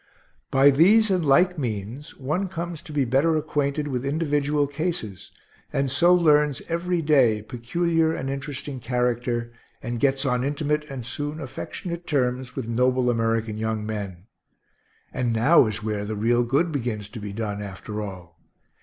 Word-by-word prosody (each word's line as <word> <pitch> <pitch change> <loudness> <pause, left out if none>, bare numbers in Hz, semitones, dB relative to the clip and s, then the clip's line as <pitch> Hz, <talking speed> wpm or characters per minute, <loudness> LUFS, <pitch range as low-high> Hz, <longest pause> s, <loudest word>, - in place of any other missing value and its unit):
By 135 +1 +6
these 200 +9 +5
and 180 -3 +2
like 175 +5 +4
means 120 +4 -5
one 155 +9 -1
comes 170 -2 -5
to 170 - -11
be 145 -3 +1
better 140 +7 +2
acquainted 150 -1 -1
with 125 -3 -2
individual 145 0 +1
cases, 145 - -4 0.4
and 135 -1 0
so 170 +7 +4
learns 150 -5 +4
every 170 0 -1
day 125 -8 +3
peculiar 160 +8 0
and 135 -4 -3
interesting 135 0 -5
character, 120 -1 -1 0.3
and 120 0 -4
gets 135 +1 +1
on 125 -1 +1
intimate 150 +2 -1
and 130 -4 -6
soon 145 +5 -4
affectionate 170 +5 -6
terms 130 -3 -1
with 130 -4 -4
noble 125 +1 +2
American 115 -2 -1
young 110 -1 -2
men; 100 -4 -5 0.9
and 125 -2 0
now 120 +4 +5
is 105 -1 -4
where 105 -1 -2
the 105 +1 -4
real 120 +3 +2
good 140 +8 +1
begins 115 -7 -3
to 115 - -8
be 105 -1 -6
done, 105 -1 -4
after 105 +1 -6
all. 90 -4 -9
135 Hz, 155 wpm, -24 LUFS, 115-150 Hz, 0.9 s, By